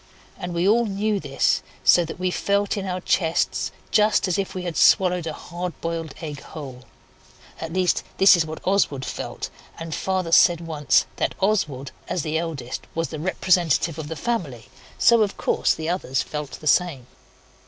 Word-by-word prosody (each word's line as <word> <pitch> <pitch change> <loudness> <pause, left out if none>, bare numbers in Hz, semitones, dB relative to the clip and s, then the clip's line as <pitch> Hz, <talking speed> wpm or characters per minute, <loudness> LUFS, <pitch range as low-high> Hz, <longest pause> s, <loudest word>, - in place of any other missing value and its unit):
And 175 -1 -6
we 170 +2 +1
all 230 +2 +4
knew 205 +1 0
this, 140 -4 +1 0.2
so 175 - +6
that 165 - -7
we 185 0 -1
felt 200 +2 0
in 200 -2 -4
our 180 0 -3
chests 165 -2 0 0.2
just 210 -2 +3
as 185 +1 0
if 195 - -3
we 185 - -4
had 175 -2 -4
swallowed 180 -3 +4
a 160 - -3
hard 175 +1 -6
boiled 165 -3 -4
egg 150 -3 -6
whole. 130 -5 -9 0.7
At 165 0 -5
least, 185 -1 +2 0.2
this 195 0 +8
is 170 - +2
what 155 0 -8
Oswald 180 -9 +1
felt, - - -5 0.3
and 165 -1 -6
Father 185 -1 -1
said 170 0 +6
once 155 -4 +1
that - - -1
Oswald, 155 -10 0 0.2
as 175 - -2
the 160 0 -1
eldest, 150 -7 -5
was 165 0 -1
the 155 - -6
representative 170 -2 +1
of 155 - -5
the 160 - -5
family, 155 - -3 0.3
so, 235 -1 +5
of 205 -2 0
course, - - +1
the 160 0 -5
others 165 -7 -1
felt 150 -2 -6
the - - -9
same. 155 -4 +2
170 Hz, 180 wpm, -23 LUFS, 155-190 Hz, 0.7 s, this